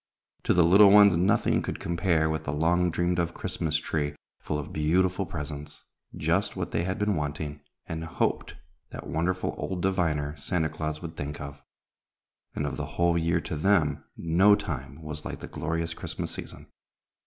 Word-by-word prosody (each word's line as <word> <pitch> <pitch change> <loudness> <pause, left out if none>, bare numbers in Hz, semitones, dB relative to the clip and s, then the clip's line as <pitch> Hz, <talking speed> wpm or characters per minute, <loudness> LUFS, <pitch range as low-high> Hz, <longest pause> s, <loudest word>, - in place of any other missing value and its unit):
To - - +3
the 90 - +6
little 100 +5 +8
ones 100 -2 +8
nothing 90 +4 +2
could - - -4
compare 85 -2 +1
with 80 0 -2
the - - -1
long 85 +4 +2
dreamed 85 +1 0
of 85 0 -1
Christmas 80 -4 -1
tree 75 -2 -2 0.2
full 75 - -3
of 75 - -6
beautiful 90 +5 +1
presents, 75 -2 -7 0.3
just - - 0
what - - -3
they 85 - 0
had 95 +2 -2
been 105 -1 +1
wanting, 75 -1 -4 0.2
and 80 0 -5
hoped 80 - -1 0.3
that - - -8
wonderful 90 +3 -1
old 90 -2 -3
diviner, 80 -6 0
Santa 80 +2 0
Claus, 75 +1 -4
would 80 -1 -6
think 75 +1 -5
of; 70 0 -8 0.9
and, 75 - -1
of 75 - -3
the - - -3
whole 85 0 +3
year 85 0 +2
to 80 - -5
them, 75 -4 +2
no 90 +5 +5
time 70 -3 -6
was 75 0 -5
like - - -6
the - - -7
glorious 80 +1 -2
Christmas - - -5
season. - - -8
80 Hz, 175 wpm, -27 LUFS, 75-90 Hz, 0.9 s, little